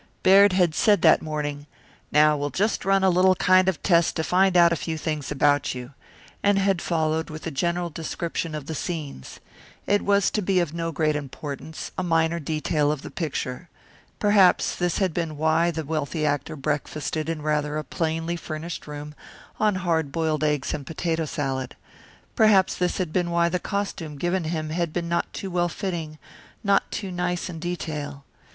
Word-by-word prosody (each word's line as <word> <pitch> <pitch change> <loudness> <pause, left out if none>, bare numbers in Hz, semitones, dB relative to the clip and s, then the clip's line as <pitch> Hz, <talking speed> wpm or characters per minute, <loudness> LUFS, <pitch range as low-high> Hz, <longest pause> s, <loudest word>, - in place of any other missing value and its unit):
Baird 195 +1 +7
had 180 -4 +3
said 205 +5 +3
that 160 - +6
morning, 145 -2 -4 0.4
"Now 150 +1 +5
we'll 145 0 -2
just 205 +7 -1
run 195 0 +3
a 190 - +5
little 185 +1 +4
kind 185 +1 +4
of 185 - -4
test 170 -3 +3
to 160 - -1
find 185 +2 +3
out 170 -1 +6
a - - +1
few 160 -1 -4
things 155 -3 -3
about 145 -1 +2
you," 125 +2 -8 0.5
and 205 0 +3
had 195 -3 +2
followed 160 -1 0
with 155 0 -8
a 165 - -3
general 170 +4 -1
description 165 0 -4
of 150 -3 -6
the 160 - -5
scenes. 150 - -5 0.5
It 205 0 +2
was 200 -1 +2
to 210 - 0
be 190 -1 +2
of 170 -3 -1
no 165 0 -2
great 155 -1 +1
importance 145 +2 -6
a - - 0
minor 165 -1 +1
detail 155 -1 0
of 150 -3 -4
the - - -8
picture. 160 -1 -4 0.5
Perhaps 205 -3 +4
this 175 -1 0
had 190 -4 +1
been 160 -3 -3
why 160 +2 +2
the 160 -2 -4
wealthy 155 +1 -2
actor 145 +1 -1
breakfasted 150 +2 -3
in 160 -2 -3
rather 150 0 0
a 155 - -2
plainly 165 +3 -2
furnished 160 0 -6
room 150 0 -7 0.5
on 210 -2 +2
hard 160 -4 +1
boiled 155 -1 0
eggs 150 -3 0
and 145 -3 -5
potato 165 0 -1
salad. 135 -4 -3 0.6
Perhaps 210 -4 +5
this 180 -1 -1
had 175 -4 -2
been 175 -2 +1
why 170 0 +2
the 180 +1 -1
costume 190 -6 -4
given 175 +3 -1
him 155 -1 -3
had 170 -1 -1
been 170 -1 -2
not 170 0 -1
too 195 - -6
well 175 0 +1
fitting, 165 -4 -4 0.5
not 200 -1 +2
too 195 -3 -4
nice 180 0 -2
in 165 - -7
detail. 150 -5 -5
165 Hz, 185 wpm, -25 LUFS, 150-180 Hz, 0.6 s, Baird